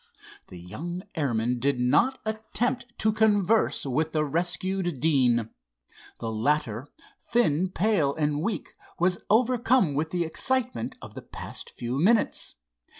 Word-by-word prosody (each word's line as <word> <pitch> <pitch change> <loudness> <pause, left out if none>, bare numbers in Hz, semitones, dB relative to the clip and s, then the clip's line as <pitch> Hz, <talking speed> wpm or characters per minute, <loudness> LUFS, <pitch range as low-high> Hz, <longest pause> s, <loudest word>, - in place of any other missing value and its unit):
The 90 - -11
young 160 - -6
airmen 125 -6 0
did 135 0 +1
not 240 - +3
attempt 235 +3 -2
to 215 - +3
converse 215 -3 +2
with 155 +4 -1
the 155 -1 +1
rescued 175 +1 -1
Deane. 120 -6 +2 0.7
The 115 -1 -3
latter, 115 +1 0 0.3
thin, 185 -7 +1
pale 180 -8 +1
and 150 -1 0
weak, 200 -1 -2 0.3
was 180 +1 +1
overcome 240 - +3
with 155 +3 -1
the 175 +1 0
excitement 225 - -1
of - - -9
the - - -8
past - - -7
few 120 +3 -4
minutes. 215 +7 +2
160 Hz, 130 wpm, -27 LUFS, 135-215 Hz, 0.7 s, not